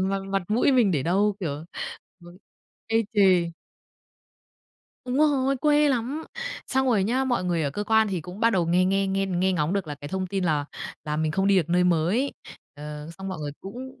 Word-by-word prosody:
mặt 195 +1 0
mặt 195 -1 0
mũi 240 +6 +3
mình 235 -6 +4
để 145 -6 0
đâu, 200 +5 +1
kiểu, 150 -2 -4 0.6
ừ, 175 +1 -14 0.5
ê 225 0 +3 0.2
chề. 185 -4 +4 1.5
Đúng 250 +1 -2
rồi, 275 -3 +3
quê 295 +2 +3
lắm! 265 +5 -1 0.4
Xong 265 0 +1
rồi 215 -7 +3
nhá, 255 +5 +1
mọi 245 -8 0
người 170 -3 0
ở 140 - 0
cơ 205 +7 -4
quan 220 -1 +3
thì 185 -4 -2
cũng 180 +7 -9
bắt 230 - +4
đầu 180 -6 +1
nghe 180 +2 +3
nghe 195 +1 +1
nghe 195 0 0
nghe 185 0 +1
ngóng 160 -1 0
được 195 -3 -1
là 150 - -5
cái 145 0 -9
thông 190 +2 -2
tin 190 0 -2
là 150 -4 +1 0.4
là 150 0 -2
mình 155 0 0
không 195 +3 +1
đi 200 -1 +4
được 170 -3 +2
nơi 180 +1 +3
mới, 180 - +1 0.4
ờ, 150 +1 -8
xong 195 - -5
mọi 185 -4 -5
người 145 -1 -4
cũng 250 +7 -9
190 Hz, 210 wpm, -25 LUFS, 170-225 Hz, 1.5 s, mình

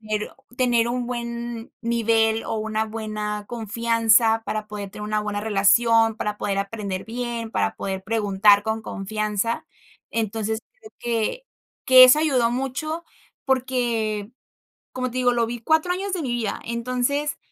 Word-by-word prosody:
tener 215 -1 -3 0.3
tener 240 -2 +2
un 245 0 -2
buen 235 -1 -5
nivel 225 -1 +2
o - - -3
una 220 0 -1
buena 215 -1 -4
confianza 225 0 +2
para 215 -1 -3
poder 205 -2 -6
tener 210 - -9
una 215 0 0
buena 210 -1 -3
relación, 225 +2 +3
para 210 -2 -3
poder 195 -1 -1
aprender 200 -2 -4
bien, 235 -1 -4
para 220 - 0
poder 190 -1 -4
preguntar 205 -1 +4
con 220 0 -2
confianza. 215 +2 -2 0.4
Entonces, 220 0 -2 0.2
creo 435 -2 -14
que 240 - -2 0.4
que 260 0 +9
eso 255 +4 +7
ayudó 255 -7 +2
mucho 275 +6 -3 0.4
porque, 240 -5 -1 0.6
como 255 0 -2
te 255 - -5
digo, 245 -1 +3
lo 235 -1 +2
vi 240 0 -5
4 315 +7 +2
años 390 +1 -3
de 360 - -1
mi 255 - -3
vida. 230 -4 -2
Entonces, 250 +5 -1
225 Hz, 145 wpm, -23 LUFS, 215-245 Hz, 0.6 s, que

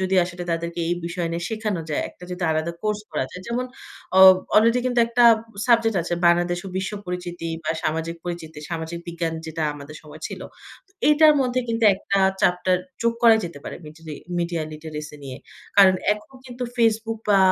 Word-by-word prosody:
যদি 190 0 0
আয় 175 - 0
সে 175 - -13 0.2
তাদেরকে 170 +1 -3
এই 175 - +1
বিষয় 170 0 -3
নিয়ে 170 - -3
শেখানো 215 -5 -2
যায়, 150 - 0
একটা 180 - -14
যদি 180 0 -5
আলাদা 160 +2 -1
কোর্স 210 0 -1
করা 150 -4 -1
যায়। 180 - -9
যেমন 245 +2 -1 0.5
অ - - +8 0.4
অলরেডি 230 +3 +5
কিন্তু 245 -1 +2
একটা 235 +1 +3 0.4
সাবজেক্ট 230 -3 +3
আছে 175 - -2
বাংলাদেশ 175 +1 +3
ও - - -5
বিশ্ব 190 +2 -3
পরিচিতি, 175 -1 -5 0.2
বা - - 0
সামাজিক 160 +2 -2
পরিচিতি, 165 -3 -6
সামাজিক 165 0 -4
বিজ্ঞান 170 -1 -3
যেটা 160 0 -4
আমাদের 145 +1 -10
সময় 155 0 -13
ছিল। - - -8 0.5
তো 390 - -35 0.2
এটার 305 +1 +7
মধ্যে 255 -1 +1
কিন্তু 230 0 0
একটা 200 +1 -1 0.2
চ্যাপ্টার 180 +1 +2 0.3
যোগ 235 0 +2
করা 230 -1 +7
যেতে 165 -4 -7
পারে, - - -6
মিডিরি 155 0 -9 0.2
মিডিয়া 170 -1 -1
লিটারেসি 150 -1 -8
নিয়ে। 130 -2 -7 0.4
কারণ 190 -2 +7 0.2
এখন 210 +5 -10
কিন্তু 250 0 -7
Facebook 225 -1 +1
বা 200 - +6
175 Hz, 185 wpm, -23 LUFS, 165-225 Hz, 0.5 s, অ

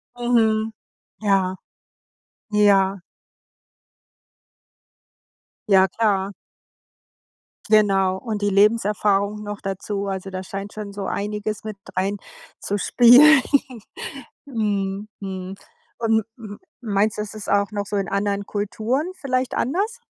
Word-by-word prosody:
Mhm. 225 -2 +2 0.5
Ja, 195 -3 +2 1.0
ja. 200 -2 +4 2.7
Ja, 190 -1 +6
klar. 200 -1 0 1.4
Genau. 195 -3 +3
Und 215 -1 -4
die 205 - +2
Lebenserfahrung 205 0 +2
noch 205 0 -6
dazu. 200 +1 -4
Also, 195 0 -4
da 185 0 -5
scheint 195 +2 -7
schon 210 -1 -6
so 200 -1 -5
einiges 210 +2 -3
mit 215 -2 -6 0.2
reinzuspielen. 235 +7 +4 1.0
Mhm. 205 -5 -2
Mhm. 190 -1 -6 0.4
Und 220 -2 +2
m 210 -3 -9 0.2
meinst 210 -1 0
du, 210 - -1
es 210 - -6
ist 215 -1 -7
auch 200 +1 +2
noch 205 -1 -3
so 205 - -4
in 195 -1 -1
anderen 200 0 -1
Kulturen 220 +7 -2 0.2
vielleicht 255 -2 -1
anders? 405 - -1
205 Hz, 105 wpm, -22 LUFS, 195-220 Hz, 2.7 s, Ja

